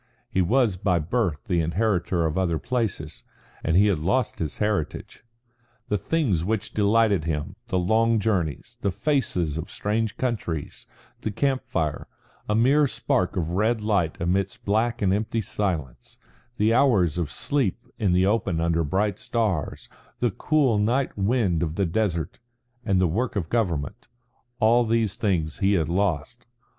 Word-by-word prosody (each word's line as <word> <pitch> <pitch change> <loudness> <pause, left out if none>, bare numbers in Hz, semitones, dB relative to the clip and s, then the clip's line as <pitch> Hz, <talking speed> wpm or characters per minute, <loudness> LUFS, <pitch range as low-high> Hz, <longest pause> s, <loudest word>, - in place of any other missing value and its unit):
He 95 - +2
was 110 +1 +2
by 90 -2 +1
birth 85 -1 -1
the 90 -7 0
inheritor 85 0 0
of 80 - 0
the 95 - 0
other 85 -3 0
places, 95 - -3 0.4
and 80 - +2
he 100 - +6
had 100 -6 +2
lost 120 +11 0
his 75 -3 -3
heritage. 105 -5 -2 0.7
The 105 - +2
things 115 - 0
which 110 +2 -2
delighted 105 -4 +3
him, 75 -2 -3
the 95 - 0
long 110 +5 +3
journeys, 95 -8 -2
the 100 - +1
faces 90 - -1
of 85 +5 -6
strange 110 +1 -1
countries, 105 - -3 0.3
the - - -2
camp 135 +5 0
fire, 75 -2 -2 0.4
a 105 - +2
mere 140 +6 +4
spark 95 -6 -1
of 85 -2 -1
red 110 +4 +1
light 100 -7 0
amidst 95 +3 -1
black 115 +3 +1
and 95 -1 +3
empty 110 +3 -1
silence, 90 - -3 0.4
the 110 +2 +3
hours 100 - +3
of 85 -4 -1
sleep 125 - -1
in 100 -4 +2
the 90 +1 +3
open 100 -5 +1
under 85 0 +1
bright 100 +6 0
stars, 105 - -2 0.3
the 120 -2 +1
cool 135 -1 +2
night 125 +6 +1
wind 100 -4 +1
of 80 -2 -2
the 100 - +1
desert, 85 -2 -1 0.4
and 95 -5 +1
the 90 - +3
work 115 +10 -1
of 85 -6 -2
government 85 - -2 0.5
all 120 +2 +4
these 115 -3 +1
things 85 -9 -1
he 100 +1 +3
had 85 -5 +1
lost. 95 - -1
100 Hz, 160 wpm, -25 LUFS, 85-115 Hz, 0.7 s, he